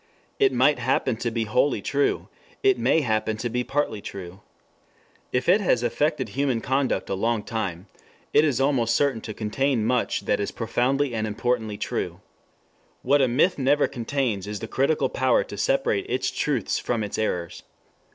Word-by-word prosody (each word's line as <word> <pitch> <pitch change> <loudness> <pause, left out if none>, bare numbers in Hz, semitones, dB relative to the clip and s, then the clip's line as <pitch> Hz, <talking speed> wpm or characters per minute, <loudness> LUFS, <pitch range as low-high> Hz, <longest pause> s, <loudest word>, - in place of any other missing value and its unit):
It 410 -2 +4
might - - +3
happen - - +1
to - - -2
be - - -1
wholly - - +1
true. 405 -1 0 0.4
It 395 -2 +4
may 160 - +3
happen 110 -3 0
to 120 +2 -3
be 125 +2 -1
partly 135 -6 -1
true. 95 -1 -8 0.9
If 125 0 -1
it 190 +5 +5
has 125 - +2
affected 135 +1 0
human 130 0 0
conduct 135 +3 0
a - - +1
long 110 +2 0
time, 95 -6 -4 0.5
it 150 - +6
is 140 -6 +1
almost 130 -4 +2
certain 140 -6 +1
to 110 - -6
contain 115 +2 0
much 125 +1 0
that - - 0
is - - -1
profoundly 135 +2 0
and 110 -1 -1
importantly 110 -1 -1
true. - - -3 0.8
What 140 +2 +4
a 130 - +4
myth 145 +8 +2
never 145 +2 +3
contains 120 -5 -2
is 105 -1 -4
the 115 - -6
critical 140 +6 +1
power 130 -2 +2
to - - -9
separate - - 0
its - - 0
truths - - -1
from 115 -3 -1
its 105 - -4
errors. 90 -6 -2
125 Hz, 170 wpm, -25 LUFS, 110-140 Hz, 0.9 s, it